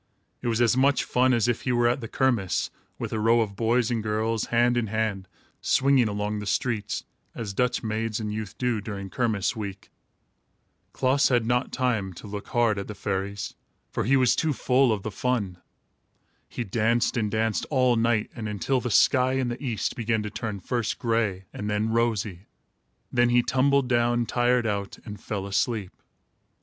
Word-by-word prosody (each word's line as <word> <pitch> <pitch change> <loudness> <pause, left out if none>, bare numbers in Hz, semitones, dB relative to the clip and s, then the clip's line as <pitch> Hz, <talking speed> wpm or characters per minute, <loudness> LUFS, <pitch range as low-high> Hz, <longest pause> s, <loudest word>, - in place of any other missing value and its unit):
It - - -3
was 115 0 +1
as 120 +1 +4
much 135 +1 +3
fun 130 +1 +2
as 120 -2 +2
if 120 -1 0
he 125 - -1
were 120 -1 +3
at 125 +3 +1
the 115 - -5
kermiss, 115 -8 0 0.3
with - - -4
a 110 - -1
row 115 +2 +4
of 100 -3 -3
boys 115 +2 +1
and 115 -2 0
girls, 110 +1 -1
hand 120 +1 +2
in 120 -2 0
hand, 105 -3 -2 0.3
swinging 135 -3 +3
along 105 0 -2
the 105 - -6
streets, 110 0 -1 0.3
as 105 -4 -5
Dutch 125 +4 0
maids 110 0 -2
and 105 -1 -3
youth 110 -3 -5
do, 125 -4 0
during 100 -2 -6
kermiss 110 -6 0
week. 100 -3 -7 1.0
Klaas 135 +2 +2
had 120 -3 +2
not 125 +2 0
time 115 -7 -1
to 85 - -11
look 105 0 -6
hard 115 -4 +2
at 100 - -5
the 105 - -7
fairies, 100 0 -3 0.4
for - - -1
he 135 +4 +4
was 130 -2 +4
too 160 -2 +1
full 130 -1 +3
of 105 -3 -1
the 110 - -4
fun. 105 -6 -2 0.9
He 120 - -4
danced 115 +3 +1
and 110 -4 0
danced, 110 0 0
all 130 -4 +3
night 115 -1 +1
and 110 -3 -4
until 125 +6 0
the 125 - -3
sky 130 +3 +4
in 130 -2 0
the 120 +4 -5
east 120 -6 -2
began 110 -2 0
to 105 - -5
turn, 110 -2 -4
first 115 +2 -2
gray 110 -5 0
and 105 - -4
then 105 +1 0
rosy. 110 -5 -1 0.6
Then 120 0 +3
he 120 0 +4
tumbled 135 +1 +2
down, 120 -1 +2
tired 120 0 +2
out, 100 -2 -2
and 105 -3 -8
fell 100 -2 -4
asleep. 100 0 -1
115 Hz, 185 wpm, -26 LUFS, 105-125 Hz, 1.0 s, as